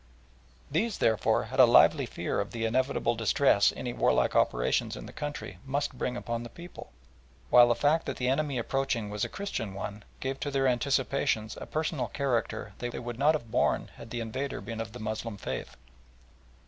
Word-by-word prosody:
These, 225 -2 0
therefore, 110 -4 +2
had - - -5
a - - +9
lively - - +6
fear - - -2
of 100 - -2
the 115 -1 -2
inevitable 120 0 +1
distress 115 -1 +3
any 120 - -4
warlike - - +2
operations - - +2
in - - -8
the - - -11
country 150 0 -6
must 135 0 -2
bring 125 0 -2
upon 120 -1 -3
the 120 - -7
people, 170 +8 -11 0.6
while 120 0 +8
the 120 - +3
fact 155 +6 +2
that 140 - -3
the 125 - -1
enemy 140 +1 +1
approaching 120 -3 -1
was 105 0 -2
a - - -1
Christian 115 - -4
one, 100 +1 -5 0.2
gave 135 0 -3
to 145 - -2
their 135 -1 +1
anticipations 130 -3 0
a - - -6
personal 155 -3 -1
character 120 -6 -2
they 120 - -3
would 120 0 -6
not 150 +3 +4
have 120 -7 -6
borne - - +1
had 115 - -10
the 120 0 -3
invader 130 +5 -3
been 115 +3 -5
of 110 -1 -7
the 125 - -8
Moslem 110 0 -4
faith. 60 -9 -5
120 Hz, 185 wpm, -29 LUFS, 115-140 Hz, 0.6 s, a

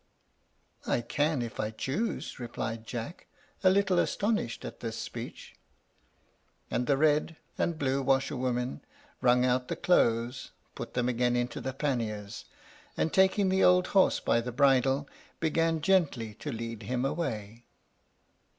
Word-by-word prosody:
"I 120 - +1
can 145 +3 0
if 115 - -7
I 105 - 0
choose," 135 - -3
replied 115 -2 -5
Jack, 120 +9 -6 0.4
a 185 - +7
little 190 -2 +3
astonished 205 - -1
at - - -8
this 115 -2 -4
speech. - - -7 1.2
And 125 - 0
the 140 - +3
red 155 +2 +2 0.2
and 170 -2 -1
blue 135 -1 0
washer 135 +2 +1
women 125 0 -2 0.4
wrung 125 0 +4
out 125 0 +1
the - - -2
clothes, 120 -6 +1 0.2
put - - -7
them 125 -1 +1
again 125 0 +1
into 120 0 -2
the 130 - -3
panniers, 115 -7 -3 0.5
and 160 - 0
taking 190 +1 +4
the 190 0 +3
old 180 0 +5
horse 195 -1 +4
by 115 - +2
the 125 +1 -5
bridle, 135 +1 +3 0.3
began 165 0 +1
gently 150 - +1
to 145 +7 -6
lead 115 -1 -5
him 125 +5 -2
away. 120 -7 -3
130 Hz, 140 wpm, -29 LUFS, 120-160 Hz, 1.2 s, a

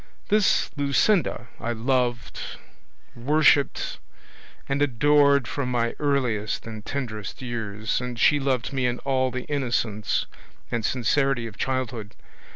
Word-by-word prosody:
This 210 -1 +3
Luscinda 145 - +2
I 120 0 -2
loved, 120 +1 -1 0.8
worshipped, 145 +2 +2 0.7
and 140 +1 -1
adored 140 0 +4
from 140 -3 -2
my 120 -1 0
earliest 125 -8 0
and 110 -2 -7
tenderest 120 -2 -5
years, 110 -2 -2
and 125 -1 -5
she 145 +4 +5
loved 135 -2 -1
me 130 -2 +1
in 120 0 -1
all 130 -1 +2
the 130 0 -4
innocence 120 -7 -1 0.5
and 115 -1 -1
sincerity 130 +2 +1
of 110 -3 -8
childhood. 125 -4 -3
125 Hz, 120 wpm, -25 LUFS, 115-140 Hz, 0.8 s, she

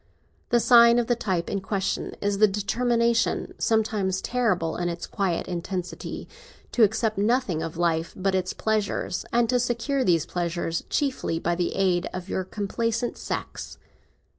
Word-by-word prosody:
The 240 - +4
sign 235 0 +7
of 240 - +2
the 240 - +1
type 185 -7 -1
in 200 - -2
question 195 0 -2
is 200 -1 0
the 215 - +7
determination—sometimes 220 -2 0
terrible 200 -10 0
in 175 0 -1
its 170 0 -4
quiet 185 -4 -1
intensity—to 185 - -5
accept 215 0 +2
nothing 210 -6 +1
of 165 -1 -5
life 165 -1 +1
but 195 +1 0
its 185 -1 0
pleasures, 215 -2 -1
and 235 0 +3
to 250 0 +3
secure 250 +3 0
these 170 -7 +2
pleasures 170 -1 -2
chiefly 270 - -1
by 170 +1 0
the 175 0 -1
aid 185 -2 +1
of 185 +1 -6
your 190 - -1
complaisant 230 +5 -2
sex. - - -5
200 Hz, 145 wpm, -25 LUFS, 180-235 Hz, -, sign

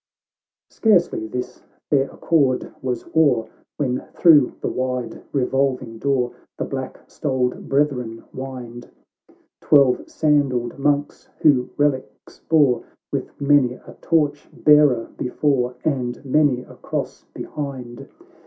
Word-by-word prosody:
— - - -71
XXII - - -25
Scarcely 180 - +3
this 125 +3 -6 0.3
fair 140 -2 +3
accord 140 -6 0
was 125 -3 -3
o'er, 135 -8 +4 0.3
When 130 -3 -1
through 150 -7 +6
the - - -3
wide 125 -2 -3
revolving 130 -3 -1
door 130 -3 0 0.3
The - - -2
black - - -5
stoled 130 -3 -2
brethren 130 -5 0
wind; 125 -2 -8 0.7
Twelve 140 -4 +4
sandalled 140 -6 +1
monks, 145 +1 -1
who 130 -5 +4
reliques 130 -7 -2
bore, 145 -7 +4 0.3
With - - -4
many 140 -3 +3
a - - -14
torch 150 -3 0
bearer 150 -6 +4
before, 125 -1 0
And 130 -3 -2
many 135 -2 +2
a - - -15
cross - - -5
behind. 130 -5 -6
135 Hz, 115 wpm, -21 LUFS, 125-145 Hz, 0.7 s, through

